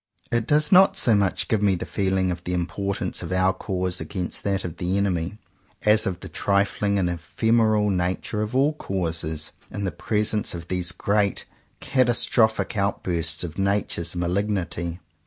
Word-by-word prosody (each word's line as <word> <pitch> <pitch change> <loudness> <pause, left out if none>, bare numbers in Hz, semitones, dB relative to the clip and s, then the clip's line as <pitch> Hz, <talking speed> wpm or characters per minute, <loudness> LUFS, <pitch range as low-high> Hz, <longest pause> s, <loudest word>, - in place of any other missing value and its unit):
It 120 -1 0
does 150 0 +3
not 190 +1 +6
so 115 - +4
much 100 -2 +1
give 110 -2 +1
me 100 -2 +3
the 85 - -5
feeling 95 -2 0
of 85 -1 -5
the 90 +1 -2
importance 100 +3 -2
of - - -6
our 95 +1 +3
cause 90 -2 -3
against 90 -3 -3
that 100 -1 -1
of 85 - -6
the 90 +2 -1
enemy, 95 -1 -1 0.5
as 105 0 +4
of 90 -1 -3
the - - -7
trifling 100 0 0
and 95 -2 +1
ephemeral 105 +5 +1
nature 90 +3 -1
of 105 +3 -3
all 140 +4 +3
causes, 80 - -3 0.2
in 100 - -5
the 95 - -1
presence 105 +3 -1
of 85 -1 -8
these 90 -1 0
great 100 +3 0 0.4
catastrophic 120 -3 +3
outbursts 85 -6 -1
of 85 +1 -6
nature's 95 -4 0
malignity. 90 -1 -2
95 Hz, 160 wpm, -24 LUFS, 90-105 Hz, 0.5 s, not